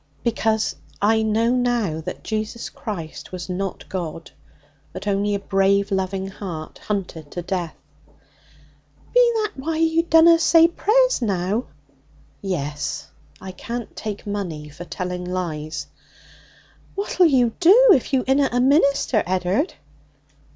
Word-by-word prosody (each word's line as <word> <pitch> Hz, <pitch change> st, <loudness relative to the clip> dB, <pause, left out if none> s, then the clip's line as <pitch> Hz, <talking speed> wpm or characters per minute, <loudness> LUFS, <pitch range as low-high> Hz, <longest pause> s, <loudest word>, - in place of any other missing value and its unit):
'Because 220 Hz, -1 st, 0 dB, 0.2 s
I 220 Hz, +2 st, +3 dB
know 220 Hz, +2 st, +1 dB
now 240 Hz, -10 st, 0 dB
that -, -, -7 dB
Jesus 220 Hz, +1 st, -4 dB
Christ 170 Hz, -8 st, -7 dB
was 185 Hz, 0 st, -6 dB
not 190 Hz, +1 st, -4 dB
God, 165 Hz, -3 st, -5 dB, 0.6 s
but -, -, -7 dB
only 205 Hz, 0 st, +1 dB
a -, -, -2 dB
brave, 200 Hz, +1 st, +1 dB
loving 190 Hz, 0 st, -1 dB
heart 185 Hz, -5 st, -7 dB
hunted 180 Hz, -7 st, -4 dB
to 175 Hz, -, -4 dB
death.' 175 Hz, -2 st, -3 dB, 0.3 s
'Be -, -, -3 dB
that 425 Hz, -, -2 dB
why 315 Hz, +4 st, -2 dB
you 325 Hz, 0 st, +3 dB
dunna 330 Hz, 0 st, +6 dB
say 330 Hz, 0 st, +6 dB
prayers -, -, +2 dB
now?' 200 Hz, +2 st, -1 dB, 0.8 s
'Yes. 150 Hz, -7 st, -3 dB, 0.3 s
I 190 Hz, 0 st, -8 dB
can't 235 Hz, +5 st, -6 dB
take 210 Hz, -2 st, -6 dB
money 175 Hz, -8 st, -4 dB
for 150 Hz, +4 st, -10 dB
telling 180 Hz, 0 st, -4 dB
lies.' 170 Hz, -4 st, -4 dB, 1.1 s
'What'll 390 Hz, -3 st, +3 dB
you 250 Hz, -6 st, +3 dB
do 430 Hz, +8 st, +7 dB
if 260 Hz, -, 0 dB
you 260 Hz, -2 st, +2 dB
inna 270 Hz, +1 st, +3 dB
a 245 Hz, -, +1 dB
minister, 275 Hz, -3 st, +3 dB
Ed'ard?' 185 Hz, -, 0 dB
205 Hz, 130 wpm, -22 LUFS, 180-265 Hz, 1.1 s, do